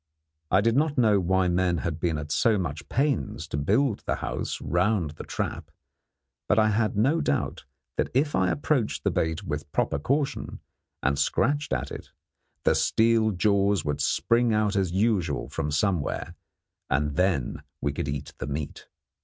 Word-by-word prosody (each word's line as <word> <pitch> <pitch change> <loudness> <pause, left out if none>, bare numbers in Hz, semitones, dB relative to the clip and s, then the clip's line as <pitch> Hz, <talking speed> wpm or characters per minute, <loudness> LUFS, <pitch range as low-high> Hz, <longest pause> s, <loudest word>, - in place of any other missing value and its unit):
I 95 - +4
did 115 +2 +2
not 150 +1 +1
know 110 -5 +4
why 95 0 +2
men 90 0 +1
had 80 -1 -3
been 80 -2 0
at 75 0 -6
so 105 +8 +3
much 80 -5 -4
pains 140 +1 0
to - - -3
build 105 - +1
the - - +1
house - - -4
round 90 -2 +1
the 75 - -9
trap, - - -4 0.8
but 105 - +4
I 110 -1 +5
had 105 0 0
no 140 +10 +3
doubt 145 - -1 0.3
that - - +1
if 145 +3 +2
I 95 -1 +2
approached 145 -6 0
the - - +2
bait 80 +4 -1
with 75 -4 -5
proper 70 - 0
caution, 140 - -1 0.4
and 70 +1 +1
scratched 145 - +1
at 60 - -2
it, - - -8 0.5
the - - +4
steel 115 -1 +3
jaws 100 -1 +2
would 75 0 -1
spring 115 - +2
out 105 -1 +1
as 95 -3 +1
usual 100 -1 0
from 75 - -2
somewhere, 85 +1 -1 0.6
and 70 +2 0
then 90 -7 0 0.2
we 70 - -1
could 70 - -3
eat 70 0 -4
the 65 - -4
meat. 75 0 -5
95 Hz, 170 wpm, -26 LUFS, 75-115 Hz, 0.8 s, I